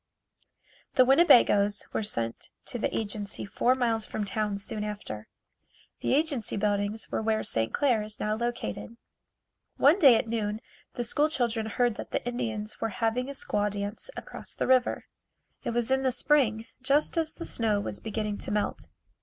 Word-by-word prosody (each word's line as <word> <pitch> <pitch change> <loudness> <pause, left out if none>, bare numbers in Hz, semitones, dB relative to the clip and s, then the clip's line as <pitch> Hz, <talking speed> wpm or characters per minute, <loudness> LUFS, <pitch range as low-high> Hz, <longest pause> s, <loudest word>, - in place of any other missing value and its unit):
The 255 - +6
Winnebagoes 235 - +5
were - - 0
sent 115 - -2 0.2
to 245 - -4
the - - -1
agency 205 -1 -4
four 245 +5 +2
miles 230 -3 +1
from 210 - -3
town 210 0 -1
soon 210 +1 -4
after. 205 - -6 0.7
The - - +1
agency 285 -9 0
buildings 205 +1 0
were - - -1
where 220 0 0
St. 115 0 0
Clair 250 -6 +2
is 210 0 -4
now 215 0 0
located. 235 - -4 0.8
One 300 +8 +5
day 270 -8 +8
at 225 - 0
noon 215 -2 -2 0.4
the 240 - -2
school 295 +6 +2
children 235 -6 0
heard 240 0 0
that - - -7
the - - -3
Indians 220 -3 -3
were 225 - 0
having 230 +5 -1
a - - -4
squaw 210 -6 0
dance 205 - -4
across - - -6
the - - -1
river. 255 -1 +2 0.6
It - - -2
was 235 +1 -1
in 265 0 +3
the 260 -1 +1
spring, 235 -5 +2 0.2
just 280 +4 +2
as 325 -2 0
the 335 - -7
snow 220 -3 +1
was 205 - -4
beginning 215 -1 -3
to - - -4
melt. 210 0 -2
225 Hz, 170 wpm, -28 LUFS, 210-250 Hz, 0.8 s, day